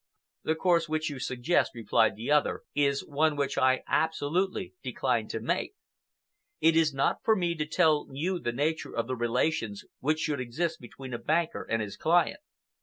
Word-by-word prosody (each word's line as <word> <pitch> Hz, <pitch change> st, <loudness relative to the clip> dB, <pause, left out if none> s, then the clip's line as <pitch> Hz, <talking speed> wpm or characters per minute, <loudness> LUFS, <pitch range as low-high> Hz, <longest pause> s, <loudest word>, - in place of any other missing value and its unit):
"The 160 Hz, -, +1 dB
course 170 Hz, -1 st, +2 dB
which 155 Hz, 0 st, -1 dB
you 140 Hz, -, -6 dB
suggest," 125 Hz, +2 st, +1 dB
replied 110 Hz, -1 st, +2 dB
the 115 Hz, +6 st, -4 dB
other, 150 Hz, -1 st, +2 dB
"is 140 Hz, -1 st, +1 dB
one 155 Hz, +1 st, +1 dB
which 140 Hz, -1 st, -1 dB
I 130 Hz, 0 st, +3 dB
absolutely 160 Hz, +4 st, 0 dB
decline -, -, -1 dB
to -, -, -4 dB
take. -, -, -2 dB, 0.8 s
It 165 Hz, 0 st, +4 dB
is 160 Hz, -2 st, +4 dB
not 135 Hz, 0 st, +1 dB
for 220 Hz, -, +4 dB
me 175 Hz, -4 st, 0 dB
to 155 Hz, -2 st, -3 dB
tell 155 Hz, -2 st, +3 dB
you 175 Hz, +7 st, -2 dB
the 120 Hz, -, -2 dB
nature 150 Hz, +6 st, -2 dB
of 115 Hz, -, +1 dB
the 130 Hz, +2 st, -3 dB
relations 115 Hz, -2 st, -1 dB
which 155 Hz, +3 st, +1 dB
should 150 Hz, -3 st, -1 dB
exist 145 Hz, +8 st, -2 dB
between 130 Hz, +2 st, -9 dB
a 120 Hz, -, -3 dB
banker 165 Hz, +2 st, 0 dB
and 115 Hz, -1 st, +1 dB
his 105 Hz, -1 st, -7 dB
client. 170 Hz, -, +2 dB
150 Hz, 180 wpm, -29 LUFS, 130-160 Hz, 0.8 s, It